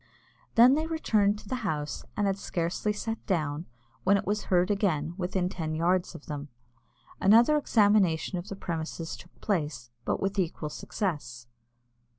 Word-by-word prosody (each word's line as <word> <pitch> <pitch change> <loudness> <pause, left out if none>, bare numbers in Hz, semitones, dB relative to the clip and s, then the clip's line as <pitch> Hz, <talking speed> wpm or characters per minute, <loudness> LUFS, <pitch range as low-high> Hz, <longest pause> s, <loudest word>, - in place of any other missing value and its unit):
They 230 - +8
then 300 +5 +3
returned 215 -11 +2
to 210 - -13
the 255 - -2
house, 150 -8 -3
and 205 - +2
had 195 0 0
scarcely 175 +4 -1
sat 225 +2 -4
down, 155 -4 -1 0.4
when 200 +2 +5
it - - -3
was 210 +2 -1
heard 180 +1 +3
again 170 -6 0
within 180 0 -1
ten 160 -4 -3
yards 175 +3 +1
of - - -10
them. 145 -1 -6 0.7
Another 230 +9 +6
examination 205 - +3
of 175 - -8
the 195 - -5
premises 165 -2 -4
took 170 - -16
place, 145 - -2
but - - -1
with 195 +1 -1
equal 165 -4 -1
success. 145 - -4
185 Hz, 160 wpm, -28 LUFS, 160-205 Hz, 0.7 s, They